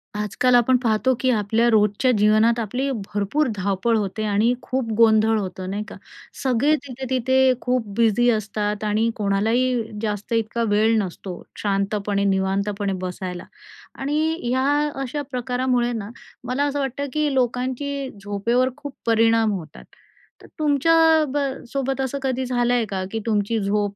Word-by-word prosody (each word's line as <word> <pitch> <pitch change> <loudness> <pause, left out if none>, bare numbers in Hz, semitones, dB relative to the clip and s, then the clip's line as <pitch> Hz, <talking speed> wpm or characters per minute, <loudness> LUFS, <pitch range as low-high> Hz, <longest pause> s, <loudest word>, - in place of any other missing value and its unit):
आजकाल 210 +4 +1
आपण 245 +1 +4
पाहतो, 240 +1 +1
की 260 - +1
आपल्या 220 +1 +1
रोजच्या 210 +3 +3
जीवनात 215 +3 +4
आपली 250 +5 -2
भरपूर 205 +7 -1
धावपळ 200 +3 0
होते 210 +1 -3
आणि 210 +3 +2
खूप 255 -2 -2
गोंधळ 220 -1 +4
होतं 185 -1 -5
नाही 205 +2 -3
का? - - -9 0.5
सगळे 265 +4 +3
तिथे-तिथे 260 0 +1
खूप 250 -3 -1
बिझी 235 +1 +3
असतात 210 -1 -2
आणि 215 +2 +1
कोणालाही 220 +3 0
जास्त 210 0 -3
इतका 230 +1 0
वेळ 220 +2 +3
नसतो 185 -2 -4 0.2
शांतपणे, 200 0 -1
निवांतपणे 195 +1 0
बसायला 180 -1 -5 0.5
आणि 310 +4 0
ह्या 255 +2 0 0.4
अशा 270 +3 -3
प्रकारामुळे 250 -1 0
ना, 210 -2 -5 0.3
मला 255 +4 -1
असं 285 0 -1
वाटतं, 275 +1 -2
की 300 -2 0
लोकांची 260 +2 -1
झोपेवर 230 +6 +1
खूप 285 -2 -8
परिणाम 225 -1 +3
होतात. 175 -6 -7 0.6
तर - - -14
तुमच्या 300 +2 +2 0.4
ब - - 0 0.3
सोबत 270 -1 -2
असं 265 +1 -2
कधी 260 -1 -1
झालं 245 -1 +1
आहे 240 -2 +2
का? 190 -1 -2
की 225 - -2
तुमची 220 0 0
झोप 205 0 0
230 Hz, 145 wpm, -22 LUFS, 205-255 Hz, 0.6 s, आपण